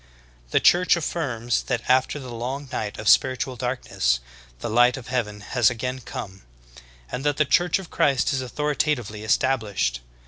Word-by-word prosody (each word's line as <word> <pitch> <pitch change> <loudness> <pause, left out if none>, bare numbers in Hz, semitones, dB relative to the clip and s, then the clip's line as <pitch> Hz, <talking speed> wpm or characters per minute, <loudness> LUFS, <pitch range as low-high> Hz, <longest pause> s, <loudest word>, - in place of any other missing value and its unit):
The - - +3
Church 180 +1 +5
affirms 130 -8 -1
that 125 -3 -1
after 130 +3 +3
the 130 -4 -8
long 130 +5 -4
night 105 -1 -3
of 110 - -6
spir 130 +4 +5
itual 130 0 -4
darkness, 120 - -1 0.4
the - - -4
light 120 +3 +4
of 130 -1 -9
heaven 105 -5 -2
has 120 +2 +2
again 125 +2 -4
come; 95 -5 -8 0.7
and 135 - -4
that 145 -1 +1
the 150 - +3
Church 175 +6 +3
of 190 -3 -10
Christ 140 0 +2
is 135 - 0
authoritatively 130 -5 -2
established. 110 - 0
125 Hz, 165 wpm, -24 LUFS, 110-135 Hz, 0.7 s, Church